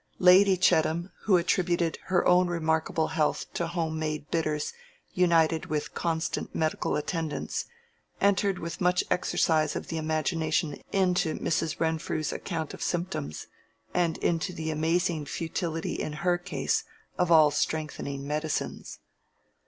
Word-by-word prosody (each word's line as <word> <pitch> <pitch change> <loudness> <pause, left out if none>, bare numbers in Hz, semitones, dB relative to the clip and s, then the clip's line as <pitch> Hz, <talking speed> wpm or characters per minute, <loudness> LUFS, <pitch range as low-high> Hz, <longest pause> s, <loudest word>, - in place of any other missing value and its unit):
Lady 185 +1 +6
Chettam, 170 0 +2
who 195 -4 +5
attributed 170 -1 +1
her 185 -1 +2
own 180 0 +5
remarkable 160 -1 0
health 155 -1 0
to 170 - -1
home 165 -2 -2
made 155 -1 -3
bitters 155 -2 -1 0.4
united 165 -3 +3
with 150 -1 -3
constant 160 -1 -2
medical 155 -1 0
attendance, 160 0 -2 0.5
entered 200 -1 +2
with 165 +1 -6
much 180 0 +3
exercise 160 -3 +2
of - - -5
the 165 - -3
imagination 155 0 -1
into 180 -4 +2
Mrs. 160 -1 -1
Renfrew's 160 -1 -1
account 160 -4 -4
of - - -9
symptoms, 170 - -3 0.5
and 170 -2 +1
into 165 +1 0
the 160 -1 -3
amazing 165 +1 0
futility 165 +1 -3
in 150 - -3
her 175 -1 +3
case 175 - -1 0.4
of 180 -1 +2
all 155 -2 +7
strengthening 140 -3 -2
medicines. 150 +1 -3
165 Hz, 130 wpm, -28 LUFS, 155-180 Hz, 0.5 s, all